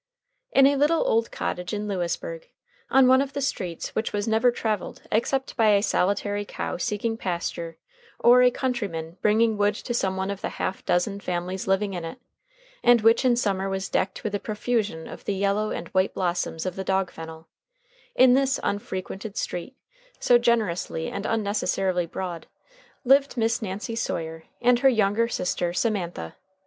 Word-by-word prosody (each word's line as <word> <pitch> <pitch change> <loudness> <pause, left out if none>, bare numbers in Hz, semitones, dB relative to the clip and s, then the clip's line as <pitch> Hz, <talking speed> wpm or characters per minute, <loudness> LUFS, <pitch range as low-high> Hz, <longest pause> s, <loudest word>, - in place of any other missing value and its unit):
In 270 - +6
a 280 +1 +4
little 305 +4 +2
old 230 +1 +2
cottage 180 +4 -3
in 210 0 -3
Lewisburg, - - -3 0.4
on 265 -1 +6
one 260 +1 +6
of 280 0 -3
the 280 - -2
streets 185 -11 -3
which 220 - -1
was 205 +1 -2
never 225 +3 +4
traveled 220 -4 -3
except 265 +5 0
by 220 -3 +4
a 200 - +2
solitary 205 +1 0
cow - - -4
seeking 210 +5 -2
pasture 170 -3 -4 0.4
or 245 +1 +6
a 250 - +7
countryman 200 -11 -3
bringing 220 +1 +3
wood 205 0 +3
to 240 - -4
some 190 -5 0
one 190 +1 -1
of 200 - -6
the - - -2
half 190 - -3
dozen 195 +3 +1
families 180 0 -3
living 195 +1 +1
in 175 -2 -4
it, 165 +10 -6 0.7
and 240 -2 +6
which 225 +4 +4
in 250 -2 +4
summer 195 -5 0
was 195 0 -3
decked 190 0 -1
with 215 - -3
a 205 - 0
profusion 210 -6 -2
of - - -10
the 200 - -1
yellow 200 +2 +1
and 170 - -5
white 185 0 +1
blossoms 175 -2 -1
of 185 -1 -3
the 190 - -4
dog 190 -1 0
fennel 160 0 -10 0.7
in 255 -1 +6
this 270 +1 +2
unfrequented 200 +1 -4
street, 180 +9 -4 0.4
so 240 -1 +5
generously 210 -9 0
and 200 - -4
unnecessarily 195 -4 0
broad, 175 -1 -5 0.6
lived 275 +1 +4
Miss 230 0 +1
Nancy 210 +3 -4
Sawyer 160 -7 -3 0.2
and 245 0 +5
her 270 - +5
younger 220 -1 +2
sister 180 -5 -1
Semantha. 180 - -2
205 Hz, 170 wpm, -25 LUFS, 185-235 Hz, 0.7 s, a